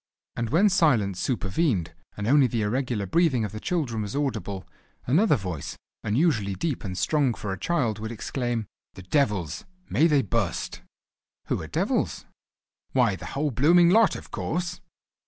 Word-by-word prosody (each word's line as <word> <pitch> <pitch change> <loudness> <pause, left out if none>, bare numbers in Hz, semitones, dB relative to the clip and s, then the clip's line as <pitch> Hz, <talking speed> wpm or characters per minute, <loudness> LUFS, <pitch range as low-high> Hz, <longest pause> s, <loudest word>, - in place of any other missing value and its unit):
And 115 -1 -2
when 180 - +4
silence 120 - +2
supervened, 105 - 0 0.2
and 105 - -3
only 135 +3 +5
the 115 -2 -1
irregular 120 -1 -1
breathing 130 - +2
of 105 - -5
the 110 - -6
children 125 -8 -1
was 105 +2 -4
audible, 110 -9 -2 0.4
another 160 - +4
voice, 90 - -5 0.3
unusually 110 - +1
deep 140 - -2
and 95 -3 -5
strong 140 -3 +1
for 100 -2 -4
a 95 - -7
child, 120 - 0
would 110 +1 -5
exclaim: 120 0 -3 0.3
"The 95 - -10
devils! 105 - 0 0.3
May 160 - +4
they 145 -4 +3
bu'st!" 95 - -2 0.7
"Who - - 0
are - - -7
devils?" - - -1 0.7
"Why, 120 -7 +3
the - - -8
whole 150 0 +1
blooming 170 +8 +5
lot, 220 +2 +5
of - - -10
course!" 175 +1 -3
120 Hz, 155 wpm, -26 LUFS, 105-150 Hz, 0.7 s, only